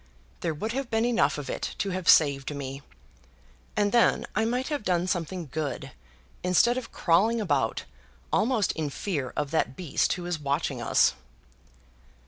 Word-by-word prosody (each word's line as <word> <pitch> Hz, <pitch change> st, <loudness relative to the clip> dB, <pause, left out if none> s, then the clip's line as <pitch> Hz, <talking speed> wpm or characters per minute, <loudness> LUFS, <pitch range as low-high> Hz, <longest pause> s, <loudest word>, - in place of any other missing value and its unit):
There 165 Hz, -3 st, -2 dB
would 215 Hz, +9 st, -3 dB
have 265 Hz, 0 st, -3 dB
been 225 Hz, +1 st, +1 dB
enough 240 Hz, -8 st, +2 dB
of 145 Hz, -2 st, -6 dB
it -, -, -4 dB
to 195 Hz, -, -1 dB
have 185 Hz, -1 st, -1 dB
saved 140 Hz, -1 st, +4 dB
me. 135 Hz, 0 st, -6 dB, 1.0 s
And 205 Hz, -1 st, +2 dB
then 235 Hz, -1 st, +3 dB
I 220 Hz, -, +2 dB
might 250 Hz, +4 st, -1 dB
have 295 Hz, -4 st, -2 dB
done 180 Hz, -3 st, +1 dB
something 175 Hz, -2 st, -3 dB
good 145 Hz, -4 st, -3 dB, 0.5 s
instead 185 Hz, +7 st, +3 dB
of 250 Hz, -2 st, -5 dB
crawling 205 Hz, +8 st, +2 dB
about 210 Hz, -, 0 dB, 0.5 s
almost 225 Hz, -4 st, +2 dB
in 155 Hz, -3 st, -3 dB
fear 140 Hz, -5 st, -3 dB
of 145 Hz, -1 st, -2 dB
that 155 Hz, -4 st, 0 dB
beast 170 Hz, -7 st, 0 dB
who 180 Hz, -1 st, -6 dB
is 175 Hz, -3 st, -2 dB
watching 140 Hz, -1 st, -1 dB
us." -, -, +3 dB
180 Hz, 160 wpm, -27 LUFS, 150-225 Hz, 1.0 s, saved